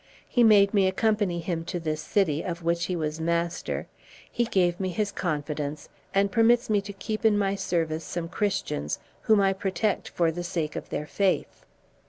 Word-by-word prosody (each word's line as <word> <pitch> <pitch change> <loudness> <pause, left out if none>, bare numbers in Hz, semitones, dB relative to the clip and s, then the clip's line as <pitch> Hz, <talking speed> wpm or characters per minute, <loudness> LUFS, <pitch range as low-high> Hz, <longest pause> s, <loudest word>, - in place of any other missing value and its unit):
He 245 - +3
made 205 -2 +6
me 195 -2 +4
accompany 200 -3 +1
him 165 -1 -2
to 175 - -3
this 155 -2 -2
city, 160 -7 +1
of 170 -1 -4
which 170 +1 +1
he 180 - -2
was 155 -1 -3
master, 170 +1 -1 0.5
he 240 - +1
gave 180 -5 +1
me 190 -1 -1
his 205 +2 -1
confidence, 150 -4 -3 0.2
and 195 0 +2
permits 235 +1 +3
me 205 -1 +3
to 200 +1 -8
keep 215 +3 -4
in 220 -2 +4
my 195 -1 +1
service 165 -4 -1
some 170 -1 -4
Christians, 180 - -2 0.3
whom 215 -1 +6
I 195 -1 +3
protect 195 +2 -1
for 170 -2 +1
the 175 +2 -5
sake 165 -3 -3
of - - -6
their 150 - -3
faith." 195 +4 -1
180 Hz, 185 wpm, -27 LUFS, 165-205 Hz, 0.5 s, made